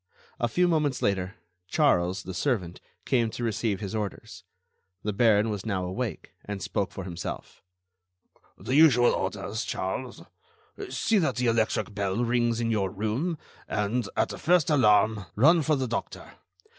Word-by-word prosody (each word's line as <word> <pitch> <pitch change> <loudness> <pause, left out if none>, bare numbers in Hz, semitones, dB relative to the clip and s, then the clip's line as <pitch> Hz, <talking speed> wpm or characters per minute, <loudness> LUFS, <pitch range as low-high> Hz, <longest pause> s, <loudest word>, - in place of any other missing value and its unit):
A 120 - +1
few 180 +8 +2
moments 150 -6 0
later, 95 0 0 0.3
Charles, 95 - +2
the 95 - -6
servant, 95 -4 -2 0.2
came 120 -4 +2
to 120 - -6
receive 110 -3 -1
his 100 -1 -5
orders. 105 -3 -5 0.6
The 105 - -1
Baron 110 0 +3
was 105 -3 -4
now 95 -5 -2
awake, 95 -1 -4
and 105 -1 -5
spoke 100 +1 -2
for 95 - -7
himself. 90 -2 -7 1.0
"The 130 - -4
usual 135 -5 +6
orders, 110 +2 -3
Charles: 120 +7 -4 0.7
see 220 -2 +1
that 165 - 0
the 125 - -1
electric 115 -1 +1
bell 100 +3 -1
rings 120 -1 +1
in 115 -1 0
your 100 -4 0
room, 110 - -2 0.3
and, 105 +4 -1
at - - +2
the - - -7
first 170 -1 +3
alarm, 105 - +3
run 160 +9 +5
for 155 +1 +2
the 130 -2 -1
doctor. 115 - -5
110 Hz, 155 wpm, -27 LUFS, 100-125 Hz, 1.0 s, usual